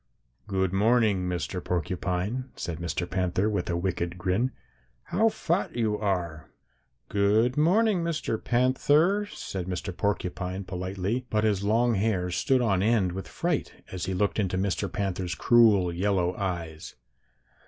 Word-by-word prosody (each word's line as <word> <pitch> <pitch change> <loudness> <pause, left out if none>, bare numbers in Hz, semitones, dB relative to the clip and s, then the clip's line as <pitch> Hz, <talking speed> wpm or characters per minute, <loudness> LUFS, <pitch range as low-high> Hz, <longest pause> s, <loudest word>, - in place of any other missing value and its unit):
"'Good 95 -1 0
morning, 105 -3 +3
Mr. 90 +1 -3
Porcupine,' 90 +6 -2
said 85 -2 -5
Mr. 85 0 -3
Panther, 95 +2 0
with 105 -3 -1
a 85 - 0
wicked 85 -1 -2
grin. 95 +8 0 0.5
'How 225 +3 +2
fat 170 -3 -1
you 110 -3 +1
are!' 90 -8 -2 0.6
"'Good 105 +5 +2
morning, 185 +4 +3
Mr. 155 -9 -2
Panther,' 145 +11 +3
said 95 - -6
Mr. 90 0 -4
Porcupine 95 -1 -2
politely, 95 +6 -3
but 105 0 +1
his 105 -3 +1
long 115 +4 +2
hair 95 -4 0
stood 130 +7 +2
on 95 -5 +2
end 105 -4 +2
with 95 +2 -6
fright, - - -3
as 95 -1 -4
he 95 - -1
looked 100 +3 0
into 95 -3 0
Mr. 95 0 -1
Panther's 95 -4 -2
cruel 105 -5 +4
yellow 90 -1 0
eyes. 85 -5 -4
95 Hz, 140 wpm, -27 LUFS, 90-115 Hz, 0.6 s, cruel